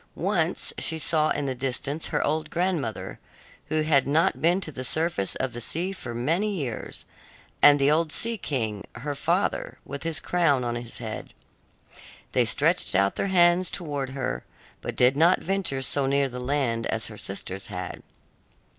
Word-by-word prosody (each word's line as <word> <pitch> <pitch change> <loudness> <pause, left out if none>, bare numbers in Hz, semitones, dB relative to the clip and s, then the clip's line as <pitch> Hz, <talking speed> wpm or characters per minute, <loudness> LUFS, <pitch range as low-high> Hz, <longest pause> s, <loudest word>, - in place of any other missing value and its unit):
Once - - 0
she 160 - +2
saw 155 0 +2
in 145 - -1
the 135 - -1
distance 135 +4 -2
her - - 0
old 155 +1 -1
grandmother, 170 - -2 0.5
who 155 0 0
had 145 -4 +3
not 160 +6 +2
been 175 +3 +3
to 165 - -5
the 130 -2 -6
surface 160 - +2
of 130 -1 -2
the 120 - -6
sea 175 - -1
for 120 -11 -7
many 170 - 0
years, 130 -10 -5 0.6
and 145 0 +8
the 140 +1 +3
old 160 0 +2
Sea 230 +7 0
King, 110 - -3
her 145 +3 -4
father, 140 - -1
with 140 +1 -6
his 165 -1 0
crown 160 -7 +2
on 120 -1 -1
his 120 -1 -6
head. 110 -1 -7 1.0
They - - +3
stretched - - +2
out 100 +1 +3
their - - -1
hands 175 -1 +4
towards 145 -6 -4
her, 135 -2 -3 0.4
but - - -5
did 125 +2 +4
not 170 +5 +5
venture 185 -8 -1
so 135 0 +2
near 140 0 +2
the 125 -1 -7
land 125 -3 0
as 110 0 -1
her 110 - -7
sisters 95 0 -3
had. - - -6
145 Hz, 170 wpm, -26 LUFS, 125-165 Hz, 1.0 s, and